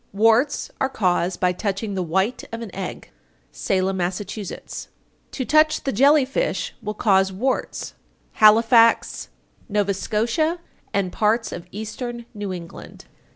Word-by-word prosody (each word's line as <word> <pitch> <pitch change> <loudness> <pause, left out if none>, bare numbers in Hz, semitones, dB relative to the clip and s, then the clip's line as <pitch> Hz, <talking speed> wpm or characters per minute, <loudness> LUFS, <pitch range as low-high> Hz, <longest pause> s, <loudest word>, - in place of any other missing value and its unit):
_ - - -42
878. 210 - -2
Warts 245 +6 +2
are 265 - +2
caused 180 -6 0
by 180 -1 +2
touching 200 +2 -3
the 190 - -1
white 190 +8 0
of 230 0 -5
an 205 - -9
egg. 190 -1 -6 0.4
Salem, 190 0 -1
Mass. 180 0 -1
879. 205 -1 -7 0.4
To 260 - -4
touch 310 +2 +3
the 275 - -1
jelly 275 +5 +5
fish - - -2
will 210 0 -4
cause 195 -3 +3
warts. 245 +8 -2 0.5
_Halifax, 225 +2 +5 0.4
N.S., 210 - 0 0.4
and 195 -2 0
parts 225 +2 +1
of 175 0 -7
Eastern 235 +3 -6
New 205 -3 -5
England. 170 -2 -9
210 Hz, 140 wpm, -22 LUFS, 190-240 Hz, 0.5 s, jelly